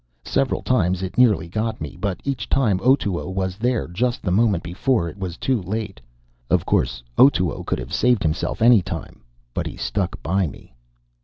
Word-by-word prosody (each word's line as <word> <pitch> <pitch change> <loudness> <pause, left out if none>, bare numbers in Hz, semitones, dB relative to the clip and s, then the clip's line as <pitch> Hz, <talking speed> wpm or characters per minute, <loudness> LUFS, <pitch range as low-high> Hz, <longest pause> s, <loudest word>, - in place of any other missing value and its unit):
Several 135 -1 0
times 95 -7 +1
it 95 - -5
nearly 110 -10 +4
got 110 +5 -2
me, 75 -2 -6
but 95 +1 -3
each 130 -5 -3
time 110 -9 +2
Otoo 105 -9 +2
was 95 -1 -2
there 120 0 0
just 120 +8 -1
the 90 - -1
moment 100 -2 +2
before 90 +2 0
it 85 - -7
was 90 -2 -4
too 130 -5 0
late. 100 - -4 0.5
Of - - +2
course, - - 0 0.2
Otoo 95 -10 +4
could - - 0
have 60 +2 -7
saved 125 -4 +2
himself 80 +7 -1
any 120 -3 +7
time. - - -7 0.3
But - - -2
he - - -8
stuck 95 -3 -2
by 95 +1 +1
me. 65 - -12
100 Hz, 180 wpm, -22 LUFS, 90-120 Hz, 0.5 s, any